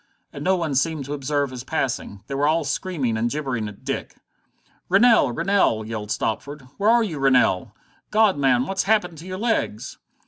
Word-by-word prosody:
And 140 - -7
no 190 +3 +3
one 165 -5 -2
seemed 145 +1 0
to 145 - -5
observe 145 -1 -1
his 125 -1 -7
passing. 125 -8 -3
They 140 - -7
were 140 +2 +1
all 160 +1 +2
screaming 145 - -2
and 115 +2 0
gibbering 130 -6 -3
at 105 - -15
Dick. - - -4 0.7
"Rennell! 200 - +5
Rennell!" 165 - +1
yelled 110 -2 -5
Stopford. 140 +8 -3 0.2
"Where 205 +2 +2
are 235 0 +5
you, 165 -9 -4
Rennell? 130 -9 +2 0.3
God, 215 -2 +4
man, 130 -3 +2
what's 190 +4 -1
happened 180 -7 +1
to 170 - -10
your 185 0 -5
legs?" 220 - -2
145 Hz, 180 wpm, -23 LUFS, 125-185 Hz, 0.7 s, Rennell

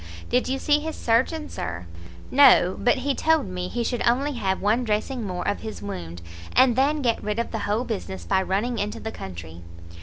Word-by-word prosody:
"Did 250 - +1
you 265 - 0
see 295 +2 +2
his 315 +1 -5
surgeon, 265 +7 +1
Sir?" 90 - -5 0.5
"No; 255 -9 +6
but 245 - +3
he 275 +1 -1
told 320 0 +2
me 180 -1 -4
he 240 +5 -2
should 245 +1 -2
only 265 +5 +2
have 195 -6 -1
one 220 +5 +1
dressing 230 +3 -1
more 180 -1 -4
of - - 0
his 220 -2 -7
wound, 85 - -6 0.3
and 255 -2 +5
then 285 +3 +2
get 235 -2 +1
rid 210 0 -2
of 235 - -2
the 225 - -3
whole 215 +4 +1
business 140 - -5
by 190 - +2
running 210 +5 -1
into 205 +1 -3
the 220 - -5
country." 85 - -9
230 Hz, 205 wpm, -24 LUFS, 190-260 Hz, 0.5 s, No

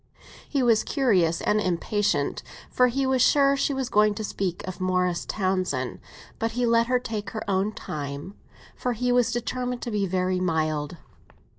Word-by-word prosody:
He 275 -3 +1
was 230 -3 +4
curious 185 - +2
and 210 0 +2
impatient, 185 -4 0 0.3
for 250 - +4
he 270 +2 0
was 260 -1 +2
sure 275 +1 +5
she 275 - 0
was 265 -2 -2
going 210 -2 +3
to 215 - -4
speak 190 -3 -3
of 185 0 -6
Morris 180 -1 0
Townsend; 185 -10 -1 0.4
but 225 0 -1
he 245 +1 0
let 230 0 +3
her 255 0 +3
take 215 -5 -4
her 220 0 -6
own 195 +1 +1
time, 145 -1 -6 0.4
for 250 - -2
he 245 +2 0
was 245 -1 +3
determined 250 +1 -3
to 240 - -4
be 205 -2 0
very 185 0 0
mild. 155 -3 -1
210 Hz, 170 wpm, -25 LUFS, 180-245 Hz, 0.4 s, sure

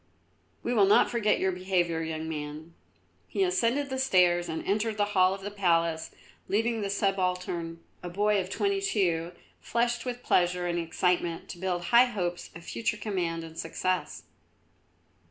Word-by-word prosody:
We 240 - -1
will 205 -4 +5
not 200 - +5
forget 225 -3 +2
your 190 - +1
behaviour, 180 -3 0
young 160 0 -4
man." 155 +1 -6 0.5
He 390 - 0
ascended 280 -5 +1
the 265 - -2
steps 180 -8 +3
and 160 - -4
entered 215 +2 0
the 205 - +2
hall 185 -1 +4
of 195 - -11
the 205 +1 -5
palace, 170 -5 +1 0.4
leaving 225 +2 0
the 200 - -2
subaltern, 180 -4 -1 0.2
a 180 - -6
boy 205 +2 +2
of 185 - -7
twenty 395 - 0
two, 175 - 0 0.3
flushed 240 0 0
with 245 -1 -5
pleasure 180 0 +2
and 175 0 -1
excitement, 170 0 -1
to 175 - -7
build 180 -1 -2
high 240 +6 +6
hopes 180 -8 -3
of 165 0 -10
future 215 +2 -2
command 180 -6 -2
and 165 0 -9
success. 185 +2 -2
185 Hz, 160 wpm, -28 LUFS, 170-215 Hz, 0.5 s, high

